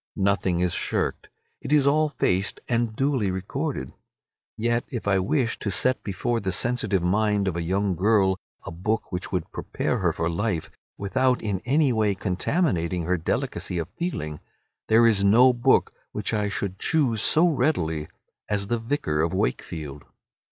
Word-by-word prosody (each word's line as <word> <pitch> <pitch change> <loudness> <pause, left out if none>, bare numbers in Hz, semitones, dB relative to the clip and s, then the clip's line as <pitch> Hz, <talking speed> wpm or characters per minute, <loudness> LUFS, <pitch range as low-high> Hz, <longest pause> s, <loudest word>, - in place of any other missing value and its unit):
Nothing 95 -3 +1
is 90 -2 +1
shirked. - - -2 0.3
It - - -6
is 150 -2 +4
all 155 +2 +3
faced 95 -8 0
and 120 -2 0
duly 135 -6 +1
recorded. 95 - -3 0.6
Yet 120 +1 0
if 120 -5 -5
I 95 -1 +3
wished 115 +5 0
to 105 - -2
set 130 +7 +1
before 115 +4 -1
the 95 -3 -2
sensitive 105 -2 0
mind 105 +2 +1
of 90 - -1
a 85 - -2
young 95 +3 0
girl 95 0 +2 0.3
a - - -6
book 105 +7 -2
which 90 0 -4
would 90 -4 -2
prepare - - -2
her - - +2
for 80 - -2
life 85 0 -2 0.3
without 125 +5 +1
in 100 -4 -1
any 140 0 +3
way 105 -3 +1
contaminating 90 - 0
her 90 +3 +1
delicacy 90 +1 -2
of 85 -2 -3
feeling, 75 - -4 0.5
there 115 +1 +5
is 105 -4 +4
no 120 +6 +6
book 125 +2 +2 0.2
which - - -2
I 105 -1 0
should 100 -2 -4
choose 130 -10 +1
so 160 +9 +5
readily 90 - 0 0.4
as 100 -1 0
"The 120 +3 -1
Vicar 115 - -1
of 85 +3 0
Wakefield." 80 -7 -3
105 Hz, 165 wpm, -25 LUFS, 90-120 Hz, 0.6 s, no